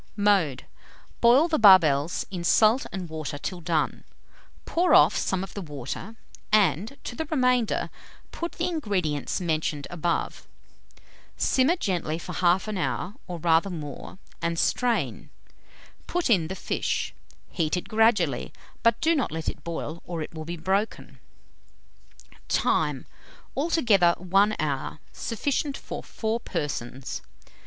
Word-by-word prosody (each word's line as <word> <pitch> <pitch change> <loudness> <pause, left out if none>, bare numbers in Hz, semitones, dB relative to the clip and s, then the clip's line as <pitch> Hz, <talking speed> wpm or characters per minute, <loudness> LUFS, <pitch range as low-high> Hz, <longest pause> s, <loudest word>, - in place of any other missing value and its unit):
Mode 195 -10 +2 0.6
Boil 250 +7 +6
the 320 -2 0
barbels 170 -7 +6
in 180 -3 -4
salt 220 +7 +4
and 185 -2 -5
water 155 -2 -5
till 175 +4 -5
done; 160 -2 -1 0.6
pour 355 +2 +3
off - - +6
some 190 -1 0
of 195 - -8
the 200 - -5
water, 150 - -6 0.4
and, 210 - +2
to 240 - -6
the 320 - -3
remainder, 250 -6 +1 0.4
put 340 0 -5
the 340 - -2
ingredients 195 - -1
mentioned 155 -4 -1
above. 175 -1 -2 0.9
Simmer 270 +6 +3
gently 175 - -2
for 180 +2 -7
1/2 185 +4 +1
hour, 180 +2 -2
or 175 - -5
rather 165 +3 +3
more, 155 -1 -7 0.2
and 170 0 -1
strain. 245 +6 0 0.8
Put 350 -7 0
in 175 -7 +3
the 190 - -5
fish; - - -2 0.4
heat 160 0 0
it 180 - -5
gradually; 225 0 +2 0.3
but 230 0 +3
do 325 +1 +4
not 285 -6 0
let 160 0 -5
it - - -9
boil, 170 -1 -5
or 170 -3 -4
it - - -9
will 160 -1 -7
be 170 +2 -5
broken. 195 +6 -2 1.3
Time. - - +1 0.5
Altogether 225 - +3
1 195 +4 +2
hour. 145 -2 -2 0.2
Sufficient 275 +4 -2
for - - -7
4 220 +1 -3
persons. 135 - -4
185 Hz, 130 wpm, -26 LUFS, 160-230 Hz, 1.3 s, Boil